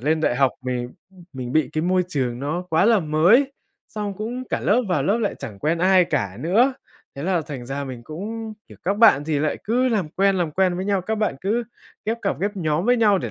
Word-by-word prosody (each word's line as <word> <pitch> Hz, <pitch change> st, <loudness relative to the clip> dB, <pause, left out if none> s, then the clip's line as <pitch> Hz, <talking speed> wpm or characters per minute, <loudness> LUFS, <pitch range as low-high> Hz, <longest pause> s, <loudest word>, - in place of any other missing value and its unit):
lên 155 Hz, +5 st, +1 dB
đại 125 Hz, -, +1 dB
học 135 Hz, -1 st, +4 dB
mình 125 Hz, -1 st, -3 dB, 0.4 s
mình 125 Hz, -2 st, -6 dB
bị 155 Hz, +1 st, +2 dB
cái 155 Hz, -, -1 dB
môi 180 Hz, +1 st, +2 dB
trường 130 Hz, -7 st, -2 dB
nó 150 Hz, +7 st, -2 dB
quá 160 Hz, +3 st, +3 dB
là 225 Hz, -1 st, +4 dB
mới, 175 Hz, -, +3 dB, 0.4 s
xong 205 Hz, -2 st, -4 dB
cũng 235 Hz, +5 st, -5 dB
cả -, -, -1 dB
lớp 240 Hz, +5 st, +2 dB
vào 180 Hz, -, +1 dB
lớp 205 Hz, +5 st, +1 dB
lại 215 Hz, -4 st, -1 dB
chẳng 100 Hz, -3 st, -8 dB
quen 160 Hz, +9 st, 0 dB
ai 185 Hz, +1 st, +5 dB
cả 100 Hz, -, -2 dB
nữa, 225 Hz, -, +3 dB, 0.4 s
thế 140 Hz, -, -6 dB
là 180 Hz, 0 st, +1 dB
thành 140 Hz, -5 st, -7 dB
ra 140 Hz, +2 st, -4 dB
mình 130 Hz, -3 st, -7 dB
cũng, 215 Hz, -, -6 dB, 0.2 s
kiểu, -, -, -14 dB
các 195 Hz, +3 st, 0 dB
bạn 210 Hz, -10 st, +6 dB
thì 150 Hz, -1 st, 0 dB
lại 150 Hz, +1 st, 0 dB
cứ 250 Hz, +4 st, +2 dB
làm 205 Hz, -9 st, 0 dB
quen, 195 Hz, +4 st, +2 dB
làm 175 Hz, -4 st, 0 dB
quen 185 Hz, +2 st, +1 dB
với 185 Hz, -, -3 dB
nhau, 200 Hz, -1 st, +1 dB
các 220 Hz, +4 st, -2 dB
bạn 215 Hz, -7 st, 0 dB
cứ 220 Hz, +5 st, 0 dB, 0.4 s
ghép 225 Hz, +2 st, -1 dB
cặp, 195 Hz, -, -1 dB
ghép 205 Hz, +1 st, -2 dB
nhóm 160 Hz, -1 st, 0 dB
với 245 Hz, 0 st, +4 dB
nhau 210 Hz, -4 st, +4 dB
để -, -, -4 dB
180 Hz, 240 wpm, -22 LUFS, 150-210 Hz, 0.4 s, bạn